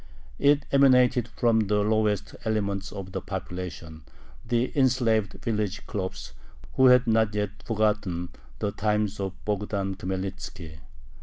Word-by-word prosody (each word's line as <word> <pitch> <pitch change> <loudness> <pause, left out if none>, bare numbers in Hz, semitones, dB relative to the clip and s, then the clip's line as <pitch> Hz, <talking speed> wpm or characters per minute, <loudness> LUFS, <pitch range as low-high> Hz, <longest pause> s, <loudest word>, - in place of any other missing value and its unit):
It 145 0 +4
emanated 125 -4 +5
from 115 -2 +1
the 105 0 +2
lowest 105 -1 0
elements 100 -3 -1
of 95 -1 -7
the - - -4
population, 90 -3 -6 0.4
the 120 +2 -1
enslaved 120 -6 +2
village 105 -3 -2
khlops, 95 -2 -5 0.4
who 130 - +5
had 125 0 +6
not 110 -2 +2
yet 105 0 -3
forgotten 105 -6 0 0.3
the 100 - -1
times 105 0 -1
of 95 -1 -2
Bogdan 100 -1 -1
Khmelnitzki. 95 -4 -5
105 Hz, 125 wpm, -26 LUFS, 95-115 Hz, 0.4 s, had